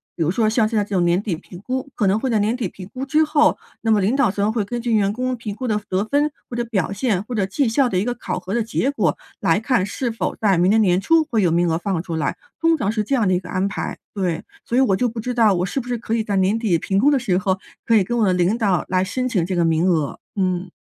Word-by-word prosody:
比 165 - 0
如 160 - +1
说 215 +3 +2
像 220 0 +2
现 225 - -4
在 210 - +3
这 205 - -11
种 180 - +3
年 175 +2 +2
底 205 -5 -2
评 175 +2 -12
估 260 +3 -3
可 205 - +1
能 195 +3 +2
会 265 - -2
在 225 -3 +2
年 215 +3 +1
底 235 -6 -2
评 185 +1 -11
估 265 +1 -4
之 305 +3 +3
后， 300 0 +3 0.2
那 225 - +1
么 215 - +4
领 205 +7 +1
导 270 -6 +3
层 205 +2 0
会 220 -2 0
根 240 +3 -4
据 235 -1 -1
员 200 -2 +3
工 255 +2 -2
评 215 -3 -6
估 255 - -5
的 215 -2 +1
得 185 +2 +1
分， 290 +5 +1 0.2
或 240 - -6
者 240 - 0
表 200 -6 -1
现， 200 -2 0
或 245 - -7
者 200 -3 +1
绩 245 +8 0
效 260 +3 +3
的 185 - -1
一 - - 0
个 245 - -1
考 240 - -4
核 185 +2 -6
的 235 - +1
结 240 +4 -1
果 195 - 0 0.2
来 165 +4 +2
看， 225 -5 +1
是 235 +5 -3
否 225 - -3
在 200 -4 +2
明 175 +2 +3
年 220 +2 +4
年 180 -3 +3
初 325 +9 +4
会 225 -3 +2
有 175 -4 +2
名 170 +1 +2
额 160 - +1
放 180 -1 -2
出 170 -3 -4
来， 155 - -1 0.2
通 330 0 +3
常 205 -8 0
是 215 -1 -1
这 275 +6 0
样 230 -6 +2
的 - - +3
一 180 - +2
个 180 - -11
安 185 +1 0
排。 - - -4 0.2
对， 180 -5 -2 0.2
所 240 - -1
以 - - +5
我 205 -8 +3
就 250 - +1
不 230 +1 -6
知 250 +3 -3
道 225 -4 +4
我 180 -1 0
是 230 - -2
不 245 - -7
是 245 -1 -1
可 225 0 -4
以 225 -1 +1
在 205 -2 -2
年 190 +3 +2
底 205 -7 +2
评 195 +4 0
估 270 +7 +4
的 290 - +3
时 195 -7 0
候， 190 -1 0 0.3
可 230 - +3
以 210 - +5
跟 240 +6 -2
我 225 - +3
的 185 - +3
领 180 +5 +2
导 195 -7 +1
来 185 0 +2
申 255 +6 -2
请 190 -9 +1
这 185 +1 -2
个 175 - +2
名 165 +2 +2
额， 155 -6 0 0.2
嗯。 185 -2 -1
210 Hz, 335 characters per minute, -21 LUFS, 185-240 Hz, 0.3 s, 以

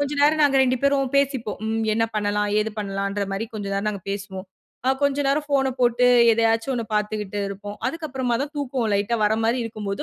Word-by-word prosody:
கொஞ்ச 285 0 -1
நேரம் 305 +1 +4
நாங்க 280 -2 +4
2 255 0 +1
பேரும் 275 -2 +2
பேசிப்போம். 270 -6 0
ம், 225 0 -1
என்ன 225 +1 +2
பண்ணலாம்? 210 0 0
ஏது 215 0 -2
பண்ணலாம்ன்ற 200 0 -2
மாரி 205 +4 -3
கொஞ்ச 205 -2 -4
நேரம் 200 +2 -1
நாங்க 200 -3 -7
பேசுவோம். 195 -1 -6 0.4
ஆ - - +5
கொஞ்ச 280 0 +2
நேரம் 290 +2 0
ஃபோன 270 -2 +2
போட்டு 245 0 +3 0.3
எதயாச்சு 225 +1 +1
ஒண்ண 230 -2 -2
பார்த்துகிட்டு 210 -1 -2
இருப்போம். 205 +1 -7
அதுக்கு 325 +3 -5
அப்புறமா 255 -3 -1
தான் 290 +1 -6
தூக்கோம் 260 -5 -1
லைட்டா 205 +4 0
வர 210 - +3
மாரி 235 +3 +2
இருக்கும் 215 -2 -6
போது, 200 - -3
225 Hz, 205 wpm, -23 LUFS, 205-270 Hz, 0.4 s, ஆ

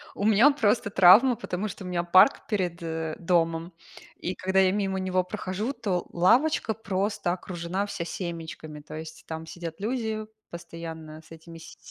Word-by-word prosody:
У 200 - -2
меня, 220 +7 +6
просто, 225 -6 +1
травма, 200 +8 +7
потому 200 -1 -4
что 200 - -8
у 180 - -7
меня 175 -1 -1
парк 185 +9 +5
перед, 180 -6 -2
э, 160 -1 -3
домом. 165 -1 0 0.4
И 185 - -4
когда 190 +1 +1
я 185 -1 +4
мимо 195 -1 -1
него 185 -1 0
прохожу, 205 +5 -4
то 200 -8 -2
лавочка 235 - +3
просто 200 -3 -2
окружена 180 +1 -3
вся 170 - -4
семечками. 165 -4 -6
То 150 - -12
есть, 160 0 -9
там 160 0 -6
сидят 165 0 -7
люди, 220 -1 -2 0.3
постоянно 160 -2 -8
с - - -22
этими 165 +1 -12
с 165 - -13
185 Hz, 165 wpm, -26 LUFS, 165-205 Hz, 0.4 s, травма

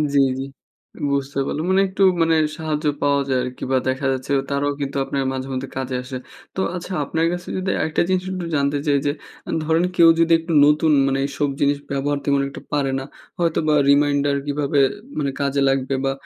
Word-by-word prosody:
জি, - - +6 0.2
জি। - - -2 0.7
বুঝতে 140 0 -1
পারলাম। 155 +4 -3
মানে 190 - +4
একটু 190 +1 -5 0.2
মানে 165 0 +3 0.2
সাহায্য 155 -1 -3 0.2
পাওয়া 140 0 +2
যায় 130 -1 +2
আরকি 125 0 -6
বা 130 - +4
দেখা 130 +2 -2
যাচ্ছে 130 +1 -5 0.2
তারাও 140 +1 0
কিন্তু 140 0 -3
আপনার 135 0 -2
মাঝেমধ্যে 130 0 -4
কাজে 130 -1 -3
আসে। 130 0 -6 0.4
তো - - -3 0.2
আচ্ছা 180 +1 -6
আপনার 160 +3 0
কাছে 175 0 -6
যদি 185 0 -2
আরেকটা 160 - 0
জিনিস 185 -1 +1
একটু 185 -2 -4
জানতে 140 0 +1
চাই 145 -1 +4
যে 145 - +2 0.4
আ - - -8
ধরেন 160 +2 +2
কেউ 170 -1 +7
যদি 165 0 +3
একটু 165 0 -4
নতুন 150 +2 +3 0.2
মানে 135 0 0
এইসব 145 +1 -1
জিনিস 145 0 +3
ব্যবহার 140 +1 0
তেমন 140 -1 +2
একটু 140 - -9
পারে 140 -2 +1
না, - - -5 0.4
হয়তো 170 -2 +1
বা 155 - +4 0.2
reminder 145 0 +3
কিভাবে 145 0 0 0.4
মানে 140 -2 0
কাজে 140 0 0
লাগবে 135 0 0
বা 135 - +2
145 Hz, 195 wpm, -21 LUFS, 135-160 Hz, 0.7 s, কেউ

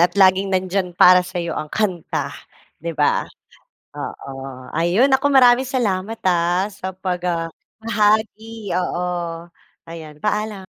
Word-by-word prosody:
at 175 +3 +2
laging 190 0 +4
nandiyan 185 -1 -1
para 180 0 +7
sa'yo 175 -2 -4
ang 155 - -4
kanta, 185 -3 -2 0.5
'di 165 0 -5
ba? 145 - +1 0.7
Oo. - - -7 0.5
Ayun, 175 - +3
naku 275 +1 +2
maraming 255 -1 +6
salamat 225 -5 -2
ah, 175 +2 +1
sa 195 -2 -7
pag, 185 -1 -3
ah, 165 -2 -1 0.3
bahagi, 220 -1 0
oo 175 -2 -3 0.4
ayan 160 -2 -9
paalam. 210 -1 -2
185 Hz, 120 wpm, -20 LUFS, 175-215 Hz, 0.7 s, para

